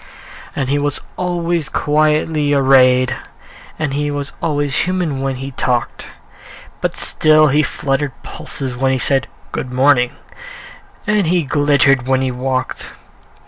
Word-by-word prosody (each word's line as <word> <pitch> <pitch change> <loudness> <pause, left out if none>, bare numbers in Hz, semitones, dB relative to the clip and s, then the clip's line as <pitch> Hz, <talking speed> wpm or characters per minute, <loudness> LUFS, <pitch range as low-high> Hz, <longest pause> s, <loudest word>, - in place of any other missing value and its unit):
And 135 -2 -1
he 145 +1 +1
was 145 0 -1 0.2
always 175 -3 -1
quietly 150 0 +1
arrayed, 130 -1 +4 0.6
And 150 -3 -2
he 145 +1 -1
was 145 -1 -4
always 145 -3 -1
human 175 -7 -1
when 135 -1 -1
he 135 +2 -6
talked; 125 -1 -2 0.7
But - - -2
still 155 0 +3
he 145 +3 +3
fluttered 140 -2 -2
pulses 130 -3 -5
when 130 +2 +1
he 130 - +1
said, 135 +1 0 0.2
"Good 130 - -4
morning," 125 -1 +3 0.9
and 210 -4 +1
he 175 0 +2
glittered 140 -2 +2
when 130 0 +2
he 130 - 0
walked. 130 +1 -3
140 Hz, 135 wpm, -17 LUFS, 130-150 Hz, 0.9 s, arrayed